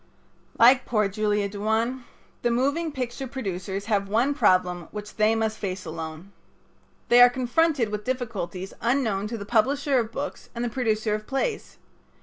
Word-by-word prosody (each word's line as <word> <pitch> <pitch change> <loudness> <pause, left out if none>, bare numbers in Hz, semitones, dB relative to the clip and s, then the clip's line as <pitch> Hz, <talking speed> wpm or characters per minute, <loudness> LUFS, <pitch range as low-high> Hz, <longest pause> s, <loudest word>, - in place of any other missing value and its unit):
Like 250 +2 +6
poor 215 -3 +2
Julia 210 0 0
Duane, 220 +5 -1 0.4
the 240 - +1
moving 285 +7 0
picture 260 -1 -4
producers 195 -5 -4
have 200 -3 0
one 240 +7 +2
problem 180 - +2
which 210 0 -8
they 215 +1 +3
must 220 -1 -1
face 185 -2 -4
alone. 160 +3 -7 0.8
They 240 +1 +7
are 245 - +10
confronted 255 +1 +1
with 210 0 -4
difficulties 210 -7 -4
unknown 230 -5 0
to 230 +2 -4
the 200 - -7
publisher 265 +5 +2
of 225 -1 -3
books 285 +4 -6
and 235 +1 -2
the - - -1
producer 220 -4 0
of 215 0 -4
plays. 345 - -2
225 Hz, 155 wpm, -25 LUFS, 200-255 Hz, 0.8 s, are